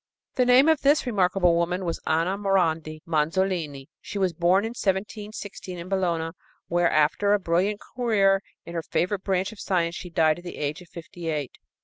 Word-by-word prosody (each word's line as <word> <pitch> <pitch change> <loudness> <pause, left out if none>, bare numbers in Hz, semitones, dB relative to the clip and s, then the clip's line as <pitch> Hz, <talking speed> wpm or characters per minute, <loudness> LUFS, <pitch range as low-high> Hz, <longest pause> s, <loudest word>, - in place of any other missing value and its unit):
The 250 -1 +2
name 255 +4 +6
of 320 -2 +3
this 285 +1 +3
remarkable 185 -5 +2
woman 175 +2 0
was 170 - -2
Anna 165 +4 +1
Morandi 165 -6 0
Manzolini. 160 -3 -1
She 205 - -6
was 190 -3 +1
born 180 +5 +3
in - - -2
1716 205 -3 -4
in 170 +1 -8
Bologna, 170 -4 0 0.4
where, 175 0 +2
after 155 +7 +2
a 205 - +3
brilliant 185 +4 0 0.2
career 200 -6 +3 0.2
in 170 - -8
her 165 - -2
favorite 185 +4 -1
branch 190 0 0
of 220 - -13
science, 170 -3 0
she 180 0 -7
died 160 -1 +2
at - - -14
the 175 - -8
age 150 +4 -3
of 175 - -15
fifty 170 +1 -9
eight. 150 -5 -2
180 Hz, 185 wpm, -25 LUFS, 165-200 Hz, 0.4 s, name